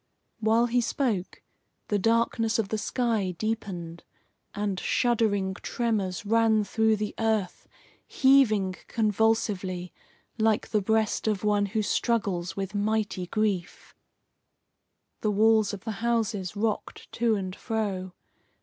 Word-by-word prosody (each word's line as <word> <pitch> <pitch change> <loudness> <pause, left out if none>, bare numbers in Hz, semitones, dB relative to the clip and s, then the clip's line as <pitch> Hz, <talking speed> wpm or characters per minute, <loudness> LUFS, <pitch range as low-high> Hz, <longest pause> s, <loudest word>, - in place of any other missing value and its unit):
While 225 +2 +3
he 240 +1 +1
spoke, 230 -7 -2 0.5
the 205 - +1
darkness 225 +1 +1
of 215 -4 -1
the 220 - -1
sky 215 -5 -1
deepened, 185 -7 -4 0.5
and 200 -2 -2
shuddering 215 -6 +1
tremors 205 -3 -2
ran 220 0 +3
through 220 +2 +2
the 210 0 -3
earth 220 -4 -1 0.4
heaving 220 -9 +3
convulsively 210 -4 0 0.5
like 220 -1 +2
the 215 -1 +1
breast 220 +2 0
of 210 -3 0
one 205 -1 +2
who 215 +2 -1
struggles 200 -6 -1
with 195 0 -3
mighty 205 -3 -1
grief. 200 -4 -2 1.3
The 215 - 0
walls 215 0 +4
of 205 - -7
the 225 - -3
houses 225 -5 -1
rocked 215 +1 -3
to 230 -1 +1
and 190 -2 -4
fro. 200 -6 -3
215 Hz, 120 wpm, -27 LUFS, 195-225 Hz, 1.3 s, walls